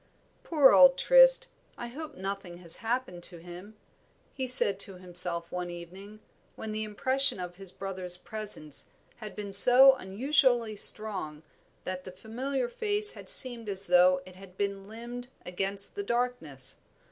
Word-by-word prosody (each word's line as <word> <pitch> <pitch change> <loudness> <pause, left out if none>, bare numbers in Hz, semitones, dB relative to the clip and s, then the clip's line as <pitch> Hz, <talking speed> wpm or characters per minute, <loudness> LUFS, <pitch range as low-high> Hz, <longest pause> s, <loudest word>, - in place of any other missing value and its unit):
"Poor 295 -5 +2
old - - +4
Trist, - - +4 0.3
I 240 - -9
hope 300 +6 -11
nothing 190 -2 -9
has 170 -2 +1
happened 230 -6 -6
to 175 - -14
him," 175 +5 -15 0.6
he 260 -1 -7
said 200 -6 +4
to 195 -1 -5
himself 180 -1 -5
one 180 0 -7
evening, 190 +5 -14 0.3
when 220 - -10
the 215 0 -6
impression 260 +3 0
of 175 -1 -10
his 195 -2 -13
brother's 185 -2 -7
presence 190 -8 -5 0.3
had 215 -4 -12
been 205 -2 -9
so 250 +6 +7
unusually 245 +1 -2
strong 190 -8 +5 0.4
that 185 0 -8
the 185 - -12
familiar 245 +7 -7
face 415 - 0
had - - -7
seemed 240 -4 +5
as 195 0 0
though 180 +1 +1
it 185 -1 -17
had 190 -1 -18
been 200 -1 -6
limned 235 +3 -11 0.2
against 195 +2 -6
the - - -7
darkness. 200 - -4
200 Hz, 150 wpm, -26 LUFS, 180-245 Hz, 0.6 s, so